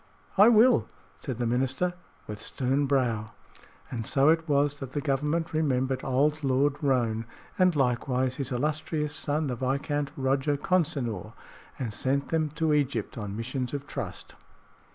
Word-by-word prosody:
"I 205 +2 +8
will," 240 +2 +5 0.3
said 130 -6 -5
the 120 - -1
minister, 130 +9 0 0.3
with 105 0 -7
stern 135 +2 0
brow. 115 -5 0 0.6
And 115 -2 -3
so 135 +5 +3
it 165 0 +2
was 145 0 +2
that 135 -1 -7
the 145 - -1
Government 150 +4 -1
remembered 135 -4 +1
old 145 +4 +1
Lord 135 +1 +2
Roane, 120 -5 +1 0.3
and 185 -2 +4
likewise 130 -1 0
his 135 -1 -3
illustrious 150 +3 -1
son, 150 +2 -1
the 130 -3 -2
Viscount 140 +3 -1
Roger 135 +2 +1
Consinor, 140 - -1 0.4
and 115 -5 -4
sent 140 +5 0
them 160 -2 +1
to 155 +1 0
Egypt 140 -7 0
on 105 -2 -5
missions 125 +3 -3
of 140 0 -5
trust. - - -6
140 Hz, 150 wpm, -28 LUFS, 125-150 Hz, 0.6 s, I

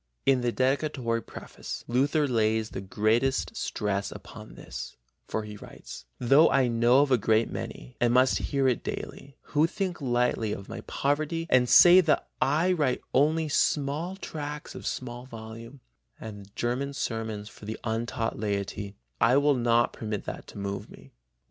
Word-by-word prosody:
In 135 -2 +4
the 120 -1 +1
dedicatory 130 -3 0
preface - - -8
Luther 145 +5 +2
lays 110 -2 +1
the - - -5
greatest 115 +6 0
stress 100 -1 -2
upon - - -11
this, - - -8 0.3
for 110 - -2
he 105 -1 -8
writes: - - -11
"Though 135 +6 +5
I 135 -2 +3
know 120 +3 +4
of 145 - -2
a 125 - +4
great 110 +2 +2
many, - - -7
and 120 -1 +4
must 130 +1 +4
hear 135 -2 +2
it 125 - +1
daily, 140 -1 -6 0.2
who 150 +2 +4
think 180 -2 -3
lightly 120 -4 +1
of 100 - -7
my - - -7
poverty 155 +4 -1
and 125 -1 +4
say 180 +1 +9
that 160 -4 +1
I 160 +7 +3
write 150 -8 +1
only 155 +3 +3
small 150 +4 0
Sexternlein 195 - -20
(tracts 150 -1 -6
of - - -7
small 125 0 -5
volume) 115 +2 -10 0.4
and 105 -3 -9
German 125 +5 -2
sermons 110 -6 -3
for 105 - -13
the 110 +1 -5
untaught 115 -1 -2
laity, 100 -1 -3 0.2
I 115 +4 +5
will 145 +1 +4
not 120 -2 +2
permit 105 -2 -4
that - - -7
to - - -11
move 100 0 -4
me. - - -15
125 Hz, 165 wpm, -27 LUFS, 110-140 Hz, 0.4 s, say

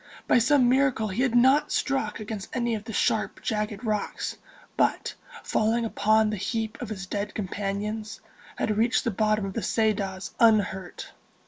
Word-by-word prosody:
By - - +5
some 255 +1 +4
miracle 255 -4 +2
he 195 +6 -2
had 255 -3 +1
not 265 +4 +4
struck 270 -7 -1
against 210 -2 -6
any 240 -2 0
of 215 -1 -4
the 225 - -6
sharp, - - 0
jagged 210 -2 -2
rocks, 215 -1 -2 0.4
but, - - +1 0.3
falling 230 +2 +1
upon 215 0 +2
the 210 - -2
heap 220 +3 -3
of 245 - -5
his 195 -3 -5
dead 200 +2 -4
companions, 210 +2 -3 0.4
had 215 -1 -1
reached 230 +2 +2
the 230 - 0
bottom 215 0 +1
of 195 - -5
the 230 - -2
Ceadas 200 -5 -1
unhurt. 205 -5 +2
215 Hz, 160 wpm, -26 LUFS, 205-235 Hz, 0.4 s, By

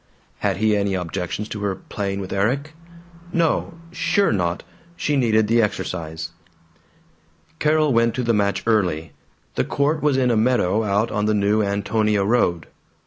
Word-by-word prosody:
Had - - 0
he 110 +1 +2
any 100 -1 0
objections 90 +3 -3
to 105 - -5
her 100 -2 -1
playing 100 0 -4
with 95 - -5
Erik? 130 +10 0 0.6
No; 170 0 0 0.2
sure 200 +1 +1
not; 90 -4 -1 0.3
she 150 - -1
needed 110 -5 +3
the 115 +2 +4
exercise. 85 -6 -3 1.3
Carol 155 -2 +3
went 115 0 +2
to 130 - -1
the 115 -1 +2
match 100 -1 +1
early. 90 -8 +1 0.4
The - - 0
court 150 +3 0
was 145 -3 +2
in 125 -2 +2
a - - +2
meadow 110 -3 +2
out 105 +2 +1
on 105 0 0
the 110 - +2
New 105 +1 +2
Antonia 105 +1 +1
road. 95 -7 +1
105 Hz, 155 wpm, -22 LUFS, 100-120 Hz, 1.3 s, the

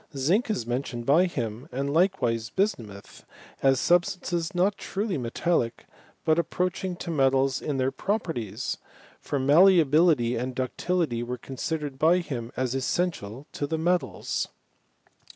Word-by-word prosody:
Zinc 180 - +2
is 165 - -1
mentioned 120 -1 -3
by 155 +8 +5
him, 120 -8 -4
and 140 +3 -2
likewise 125 - +1
bismuth, 115 - -3 0.4
as 135 -1 +4
substances 175 0 +1
not 190 +3 +2
truly 195 0 -3
metallic, 125 0 -1 0.4
but 160 +1 +3
approaching 180 +2 -1
to 170 0 -5
metals 135 -2 +2
in 145 -3 -2
their 130 0 +1
properties: 165 - -3 0.4
for 145 - -3
mallea 165 +6 +6
bility 140 -6 +3
and 125 +1 -4
ductility 130 0 -1
were 125 +1 -4
considered 140 +2 -4
by 165 +3 +5
him 125 -9 -4
as 130 -1 0
essential 135 - -2
to 145 - -3
the 160 - -1
metals. 175 +2 -1
145 Hz, 135 wpm, -26 LUFS, 125-175 Hz, 0.4 s, mallea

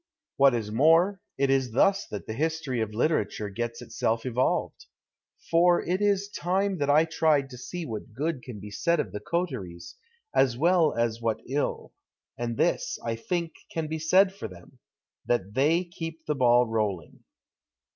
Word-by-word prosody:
\Vhat 135 -2 +6
is 110 -3 -3
more, 165 - +4 0.2
it 135 0 +2
is 130 -4 +1
thus 195 - +3
that 105 - -6
the 110 - -5
history 150 -3 -1
of 110 -1 -2
litera 125 +5 +2
ture 105 -1 -5
gets 115 +3 -4
itself 115 0 -1
evolved. 125 0 -1 0.6
For 175 +1 +4
it 185 +3 0
is 200 -1 +2
time 190 0 -1
that 145 0 0
I 150 +3 +5
tried 155 -4 +1
to 125 - -9
see 175 +6 -6
what 110 -1 -6
good 150 +1 -2
can 120 -4 -9
be 105 +1 -9
said 170 +11 +1
of - - -2
the 105 - -5
coteries, 105 - -4 0.4
as 125 -3 +3
well 165 +1 +3
as 115 -1 -1
what 115 -1 -1
ill, 140 +3 -2 0.4
and 120 -1 -3
this, - - 0
I 115 -1 -1
think, 170 +8 -2 0.2
can 165 -1 -2
be 160 +1 -4
said 185 +5 +4
for 195 - -6
them 90 -3 -15 0.2
— - - -60
that 105 -5 0
they 155 +8 +3
keep 165 -2 -8
the 150 - 0
ball 125 -3 +4
rolling. 105 -7 -2
135 Hz, 175 wpm, -27 LUFS, 115-165 Hz, 0.6 s, Vhat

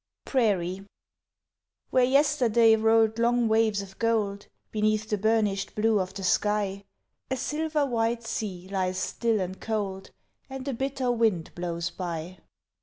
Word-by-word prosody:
PRAIRIE 195 -7 0 1.1
Where 255 - +4
yesterday 245 -4 +4
rolled 225 0 +3
long 240 0 +2
waves 220 -2 +2
of 190 -1 -14
gold 215 -3 0 0.2
Beneath 215 0 0
the 210 - 0
burnished 210 -2 +1
blue 215 0 +2
of 185 0 -2
the 195 - -6
sky, 200 +1 0 0.4
A 260 - -1
silver 300 +2 -1
white 230 -2 0
sea 185 -5 -4
lies 185 -1 -1
still 225 +3 0
and 185 0 -4
cold, 200 -3 -3 0.4
And 265 0 -7
a 275 - -1
bitter 265 0 -1
wind 220 -8 0
blows 170 -1 -3
by. 175 0 -5
215 Hz, 135 wpm, -27 LUFS, 195-235 Hz, 1.1 s, Where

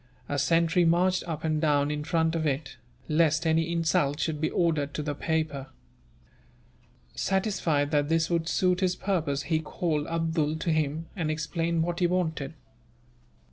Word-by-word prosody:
A 145 - -1
sentry 165 +5 +3
marched 180 +2 +3
up 160 -2 -4
and 155 -1 0
down 145 -2 +2
in 150 0 -3
front 165 0 +1
of 160 -2 0
it, 140 0 -3 0.3
lest 160 +1 +2
any 165 +1 +2
insult 165 -3 +1
should 155 -2 -2
be 155 - 0
offered 155 -5 0
to 150 - -2
the 145 0 -2
paper. 155 -3 -2 1.5
Satisfied 180 -7 0
that 145 -1 +1
this 165 0 +2
would 170 -1 0
suit 180 -1 +2
his 185 -2 +1
purpose, 160 -9 -1
he 155 +3 0
called 155 -1 -2
Abdool 165 -2 0
to 165 +1 -1
him, 155 +1 0
and 165 -5 -2
explained 165 +1 -1
what 175 +1 -2
he 175 - +3
wanted. 160 -5 -2
160 Hz, 160 wpm, -27 LUFS, 150-170 Hz, 1.5 s, sentry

